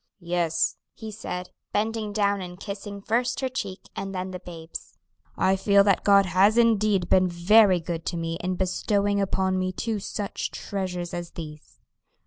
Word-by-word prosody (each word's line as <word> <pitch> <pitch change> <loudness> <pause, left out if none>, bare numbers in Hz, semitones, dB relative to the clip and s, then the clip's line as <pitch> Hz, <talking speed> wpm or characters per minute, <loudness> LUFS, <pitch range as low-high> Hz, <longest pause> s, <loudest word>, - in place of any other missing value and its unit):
"Yes," 170 -2 0 0.2
he 220 -1 -7
said, 180 -3 -6 0.2
bending 220 0 -1
down 200 -1 +1
and 180 0 -8
kissing 200 0 -7
first 240 +3 0
her 260 - 0
cheek, 200 -7 -5
and 195 0 -5
then 185 0 -3
the 180 - -6
babe's, 165 - -9 0.4
"I 190 - +3
feel 200 +1 +4
that 200 -2 +2
God 200 -1 +6
has 190 +5 +4
indeed 215 -5 +3
been 185 0 +4
very 185 +2 +5
good 165 0 -4
to 170 - -2
me 165 0 -3
in 185 +1 -1
bestowing 200 +2 0
upon 190 -1 0
me 185 0 -1
two 220 +3 -2
such 200 0 -4
treasures 180 -3 -4
as 175 -1 -5
these." 155 -2 -10
190 Hz, 165 wpm, -26 LUFS, 180-205 Hz, 0.4 s, God